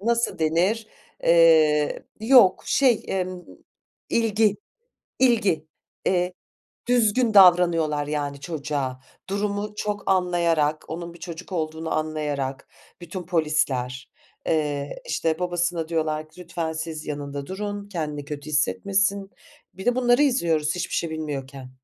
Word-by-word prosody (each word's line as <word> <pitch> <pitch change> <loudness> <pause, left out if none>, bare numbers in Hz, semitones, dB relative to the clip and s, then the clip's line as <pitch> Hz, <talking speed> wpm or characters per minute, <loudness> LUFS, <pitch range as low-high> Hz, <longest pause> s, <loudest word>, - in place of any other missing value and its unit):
nasıl 235 +2 0
denir? 180 +8 +1 0.4
Eee, 160 -3 +5 0.2
yok, 225 -5 +6
şey, 255 -5 +3
emm, 185 -1 -3 0.7
ilgi, 225 -2 +2 0.6
ilgi. 215 -11 +2 0.4
Eee, 180 0 +1 0.6
düzgün 240 -1 +3
davranıyorlar, 170 -6 +5
yani, 145 -1 -3
çocuğa. 140 -4 -3 0.3
Durumu 205 +1 -2
çok 205 -1 -2
anlayarak, 170 -5 +1
onun 170 +1 -6
bir 170 - -15
çocuk 180 +2 -8
olduğunu 160 -1 -3
anlayarak. 150 -4 -3 0.3
Bütün 175 +2 -6
polisler. 150 -7 -1 0.4
Eee, 145 -3 -1
işte, 160 -1 0
babasına 175 -2 -1
diyorlar 155 -2 -1
ki, 180 - -15
"Lütfen 165 -2 -3
siz 160 -1 -5
yanında 145 -1 -5
durun, 205 +2 -5
kendini 150 -6 -4
kötü 145 +1 -7
hissetmesin." 200 +5 +1 0.4
Bir 190 - -9
de 245 - +4
bunları 245 +2 +4
izliyoruz 165 - +1
hiçbir 180 - -3
şey 165 - -1
bilmiyorken. 140 -4 -6
165 Hz, 115 wpm, -24 LUFS, 150-200 Hz, 0.7 s, yok